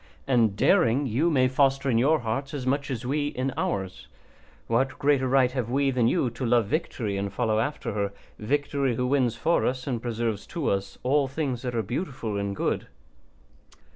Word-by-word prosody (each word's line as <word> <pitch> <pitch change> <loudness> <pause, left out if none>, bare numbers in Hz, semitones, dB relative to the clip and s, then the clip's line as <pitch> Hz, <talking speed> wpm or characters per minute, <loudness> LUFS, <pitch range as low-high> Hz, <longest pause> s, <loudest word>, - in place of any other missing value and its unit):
And 115 -6 +2
daring 120 +6 +3
you 135 +8 +1
may 130 -5 +3
foster 135 +1 +2
in 115 -3 +3
your 150 +5 +3
hearts 135 +6 -3
as 130 -3 -4
much 140 +2 0
as 125 -2 -4
we 145 +3 0
in 130 -2 -2
ours. 95 -2 -3 0.6
What 130 +3 0
greater 140 -2 +2
right 130 -1 +3
have 125 -3 -3
we 135 +2 +2
than 125 -3 +2
you 125 0 +1
to 120 +3 -7
love 120 -2 +3
victory 110 - -2
and 100 0 -2
follow 110 0 0
after 145 -2 -2
her, 100 -1 -1 0.3
victory 140 +1 0
who 125 - -1
wins 125 -3 +1
for 160 +9 +1
us 130 0 -1
and 125 -5 -2
preserves 115 -3 -2
to 165 -4 -1
us 100 0 -3
all 140 +2 +2
things 130 -3 -3
that 125 -2 -4
are 115 - 0
beautiful 120 - -4
and 100 0 -2
good? - - -1
125 Hz, 190 wpm, -26 LUFS, 115-140 Hz, 0.6 s, daring